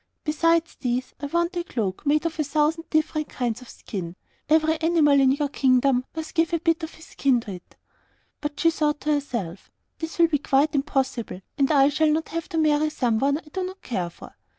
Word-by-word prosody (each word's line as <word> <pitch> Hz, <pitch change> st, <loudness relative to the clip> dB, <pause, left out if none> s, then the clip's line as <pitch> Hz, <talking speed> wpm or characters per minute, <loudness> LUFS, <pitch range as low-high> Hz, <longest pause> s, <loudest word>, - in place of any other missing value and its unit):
Besides 330 Hz, +2 st, +1 dB
these, 250 Hz, +1 st, -2 dB
I 285 Hz, -, -4 dB
want 340 Hz, +4 st, 0 dB
a 345 Hz, -, -1 dB
cloak 220 Hz, -, -3 dB
made 305 Hz, +3 st, +2 dB
of 325 Hz, -1 st, -3 dB
a -, -, +3 dB
thousand 305 Hz, +3 st, 0 dB
different 310 Hz, -1 st, 0 dB
kinds 240 Hz, -2 st, -2 dB
of 250 Hz, -, -13 dB
skin; 180 Hz, -4 st, -6 dB, 0.3 s
every 315 Hz, +1 st, +3 dB
animal 315 Hz, -4 st, +4 dB
in 265 Hz, -1 st, +5 dB
your 285 Hz, +1 st, 0 dB
kingdom 255 Hz, -2 st, +2 dB
must 320 Hz, -1 st, -5 dB
give 330 Hz, -1 st, +1 dB
a 335 Hz, -, +2 dB
bit 330 Hz, 0 st, +1 dB
of 320 Hz, 0 st, -6 dB
his 320 Hz, -, -14 dB
skin 265 Hz, -3 st, +1 dB
to 215 Hz, -, -8 dB
it.' 180 Hz, -2 st, -11 dB, 0.7 s
But 295 Hz, -1 st, -4 dB
she 330 Hz, -, +4 dB
thought 300 Hz, -2 st, 0 dB
to 305 Hz, -, 0 dB
herself, 235 Hz, -, -4 dB, 0.3 s
'This 320 Hz, 0 st, -5 dB
will 340 Hz, -1 st, +6 dB
be 300 Hz, -3 st, 0 dB
quite 285 Hz, +1 st, +2 dB
impossible, 265 Hz, -8 st, -1 dB
and 275 Hz, 0 st, +2 dB
I 280 Hz, -2 st, +5 dB
shall 310 Hz, +2 st, +2 dB
not 315 Hz, +1 st, 0 dB
have 330 Hz, -1 st, -4 dB
to 325 Hz, -, -3 dB
marry 305 Hz, -1 st, +3 dB
someone 265 Hz, +1 st, +1 dB
I 310 Hz, -1 st, -13 dB
do 375 Hz, -, -2 dB
not 375 Hz, +1 st, -7 dB
care 185 Hz, -8 st, -2 dB
for. -, -, -13 dB
295 Hz, 210 wpm, -24 LUFS, 260-320 Hz, 0.7 s, will